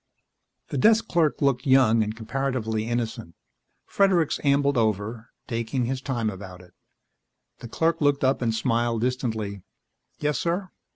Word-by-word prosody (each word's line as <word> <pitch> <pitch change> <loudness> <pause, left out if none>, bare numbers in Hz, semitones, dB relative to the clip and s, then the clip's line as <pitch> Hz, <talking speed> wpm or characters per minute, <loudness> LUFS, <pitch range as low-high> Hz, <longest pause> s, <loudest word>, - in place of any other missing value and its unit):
The - - -2
desk 225 +1 +4
clerk 160 -4 +1
looked 135 -1 +1
young 130 -4 +5
and 110 0 -2
comparatively 110 -2 -2
innocent. 115 -6 -3 0.5
Fredericks 185 -6 +2
ambled 140 0 +2
over, 110 0 -1 0.2
taking 115 +2 -2
his 130 +1 -3
time 120 -5 -2
about 95 -2 -10
it. 90 -1 -19 0.9
The 120 - -8
clerk 165 +7 0
looked 145 -1 +2
up 130 0 +2
and 115 -2 +1
smiled 115 +1 0
distantly. 110 -5 -2 0.6
"Yes, 150 0 -1
sir?" 180 +3 -2
120 Hz, 135 wpm, -25 LUFS, 110-140 Hz, 0.9 s, young